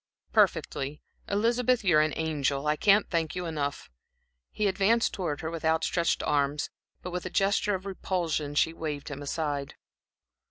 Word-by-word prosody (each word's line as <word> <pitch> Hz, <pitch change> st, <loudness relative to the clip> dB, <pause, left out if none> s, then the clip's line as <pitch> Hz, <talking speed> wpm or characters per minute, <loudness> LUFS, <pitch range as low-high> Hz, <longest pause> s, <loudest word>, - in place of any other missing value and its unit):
"Perfectly. 140 Hz, +2 st, +1 dB, 0.3 s
Elizabeth, 235 Hz, +3 st, +2 dB
you 180 Hz, -6 st, +4 dB
are -, -, +6 dB
an 155 Hz, -1 st, 0 dB
angel. 145 Hz, -3 st, -1 dB
I 150 Hz, 0 st, +2 dB
can't 200 Hz, +5 st, +4 dB
thank 165 Hz, -3 st, 0 dB
you 180 Hz, -1 st, -3 dB
enough." 145 Hz, -, -3 dB, 0.6 s
He 215 Hz, -, -2 dB
advanced 205 Hz, +4 st, +2 dB
towards 165 Hz, -7 st, -3 dB
her 160 Hz, -, -3 dB
with 165 Hz, -1 st, -6 dB
outstretched 160 Hz, +1 st, +1 dB
arms, 145 Hz, 0 st, 0 dB, 0.3 s
but 180 Hz, -, -5 dB
with 180 Hz, +1 st, -3 dB
a -, -, -5 dB
gesture 200 Hz, +2 st, +2 dB
of 190 Hz, +1 st, -7 dB
repulsion 170 Hz, -6 st, -2 dB
she 160 Hz, +2 st, +3 dB
waved 150 Hz, -3 st, -5 dB
him 145 Hz, 0 st, -6 dB
aside. 145 Hz, -1 st, -3 dB
160 Hz, 160 wpm, -28 LUFS, 150-195 Hz, 0.6 s, are